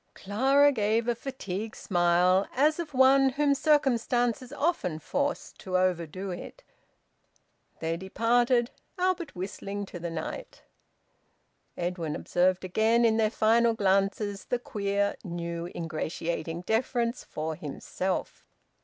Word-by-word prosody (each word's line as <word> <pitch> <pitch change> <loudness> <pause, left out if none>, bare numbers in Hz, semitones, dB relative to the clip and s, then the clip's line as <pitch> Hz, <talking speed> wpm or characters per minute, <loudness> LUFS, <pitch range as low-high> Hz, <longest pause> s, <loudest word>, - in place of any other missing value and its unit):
Clara 270 +8 +3
gave 225 -1 +1
a 240 - +3
fatigued 220 -4 -5
smile, 180 +1 +2
as 300 +5 +3
of 330 -3 -4
one 265 +1 +6
whom 280 +2 +2
circumstances 255 -4 +1
often 290 - -1
forced 285 - -3
to 185 -2 -1
overdo 185 +1 -1
it. 340 - -8 1.2
They 165 +1 -1
departed, 240 +5 +2 0.3
Albert 360 - -1
whistling 200 +2 -5
to 180 - -9
the 170 0 -4
night. - - -6 1.1
Edwin 175 -3 -2
observed 185 +1 +1
again, 220 +5 +3
in 225 -1 +3
their 220 -1 +3
final 230 +1 +3
glances, 200 0 0
the 245 - 0
queer, 200 -6 -1
new, 170 -2 -4
ingratiating 165 +1 -3
deference 235 +3 0
for 160 +1 -4
himself. 160 +5 -4
210 Hz, 115 wpm, -28 LUFS, 180-250 Hz, 1.2 s, one